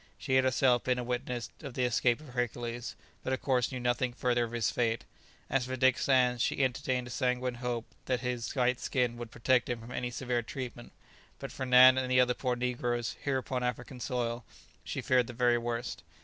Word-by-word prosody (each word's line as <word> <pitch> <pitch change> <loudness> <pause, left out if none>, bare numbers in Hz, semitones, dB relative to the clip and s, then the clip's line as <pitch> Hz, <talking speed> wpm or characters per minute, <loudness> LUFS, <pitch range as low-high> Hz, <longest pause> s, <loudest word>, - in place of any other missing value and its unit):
She 130 - -3
had 130 0 +5
herself 130 -1 +3
been 125 -1 +2
a 125 - -2
witness 125 0 -3
of 140 -5 -8
the 130 - 0
escape 120 0 +2
of 155 - -12
Hercules, 120 -1 -3 0.3
but 130 - -1
of 130 - -2
course 125 -2 +1
knew 130 - -4
nothing 120 0 0
further 120 -1 +1
of 115 - -9
his 115 -4 0
fate; 115 -2 0 0.4
as 130 -2 0
for 130 - -2
Dick 130 -1 +3
Sands, 125 -3 +3
she 135 - +1
entertained 130 -1 0
a 120 - -8
sanguine 125 0 0
hope 120 -1 -3 0.2
that 125 -2 0
his 125 -1 -3
white 125 -1 +2
skin 125 -2 0
would 120 -1 -6
protect 125 +2 +1
him 120 -1 -2
from 115 +2 -11
any 125 0 -2
severe 125 0 -1
treatment; 120 0 -7 0.5
but - - -7
for 130 - -4
Nan 130 +1 +8
and 130 -1 -2
the 125 0 +4
other 125 0 +4
poor 125 0 -1
negroes, 120 -1 -1
here 140 -2 +1
upon 130 -1 -3
African 125 +1 -3
soil, 120 -2 -2 0.4
she - - -4
feared 125 -2 +3
the 120 - -7
very 120 0 +3
worst. 120 +1 -3
125 Hz, 210 wpm, -31 LUFS, 120-130 Hz, 0.5 s, Nan